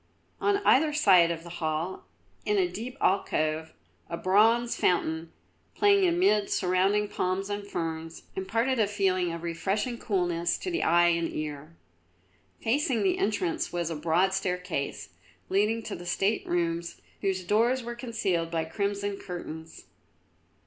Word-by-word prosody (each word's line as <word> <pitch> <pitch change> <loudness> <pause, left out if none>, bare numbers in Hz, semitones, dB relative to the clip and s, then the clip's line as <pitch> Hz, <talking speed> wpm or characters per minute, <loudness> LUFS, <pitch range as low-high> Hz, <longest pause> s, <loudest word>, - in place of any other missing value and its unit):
On 405 0 +2
either 300 +3 +5
side 190 - +5
of 165 -1 -4
the 170 0 -9
hall, 160 +3 -2 0.4
in 420 - +1
a 375 -2 +3
deep 255 -4 -7
alcove, 160 -4 0 0.4
a 170 - -3
bronze 225 +6 +3
fountain, 160 -2 0 0.4
playing 400 -2 +4
amid 335 - +2
surrounding 190 +3 +2
palms 190 +1 -2
and 205 0 -4
ferns, 165 -2 -4
imparted 230 +7 0
a 215 - +3
feeling 185 -3 +1
of 170 0 -6
refreshing 200 +8 -2
coolness 175 -5 0
to 365 - -4
the 345 - -1
eye 175 +1 +4
and 170 -1 0
ear. 155 +1 -6 0.9
Facing 255 -2 +1
the 190 - +1
entrance 195 -5 -1
was 170 -1 -2
a - - -2
broad 170 +5 +2
staircase, 180 -6 -3 0.4
leading 215 +4 +1
to - - -5
the 175 +1 -9
state 195 +4 0
rooms 170 -1 -1 0.2
whose 190 -2 -1
doors 235 +7 +2
were 240 0 -5
concealed 215 -9 -2
by 165 -1 -1
crimson 200 +3 -2
curtains. 165 -3 -8
190 Hz, 140 wpm, -28 LUFS, 170-220 Hz, 0.9 s, either